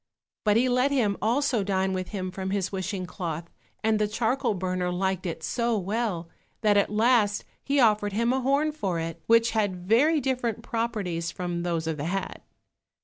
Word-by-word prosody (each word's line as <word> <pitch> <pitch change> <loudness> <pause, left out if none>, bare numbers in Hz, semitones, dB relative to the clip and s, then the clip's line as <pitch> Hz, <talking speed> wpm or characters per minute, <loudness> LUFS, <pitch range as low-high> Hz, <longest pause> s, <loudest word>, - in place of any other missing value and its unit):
But 210 0 +4
he 250 +2 +3
let 250 +2 +3
him 235 -8 +1
also 240 0 +1
dine 190 -1 0
with 185 -1 -3
him 185 -3 -4
from 190 0 -4
his 195 -1 -1
wishing 190 -1 -3
cloth, 170 -3 -5 0.4
and 220 0 +2
the 210 - +2
charcoal 225 +1 0
burner 180 -1 -1
liked 190 0 -1
it 165 -1 -5
so 235 -1 0
well, 200 -3 -2 0.3
that 210 -2 +4
at 200 - +3
last 215 -1 +2 0.2
he 280 0 +1
offered 210 -4 +3
him 235 +4 +2
a 265 - 0
horn 280 +4 +2
for 195 - -2
it, 165 0 -5
which 230 0 +5
had 205 -4 0
very 295 +9 +4
different 245 -4 -1
properties 210 -9 -2
from 175 -2 -3
those 170 -2 -1
of 160 -1 -2
the 145 - -3
hat. 195 +3 -3
205 Hz, 185 wpm, -27 LUFS, 185-235 Hz, 0.4 s, which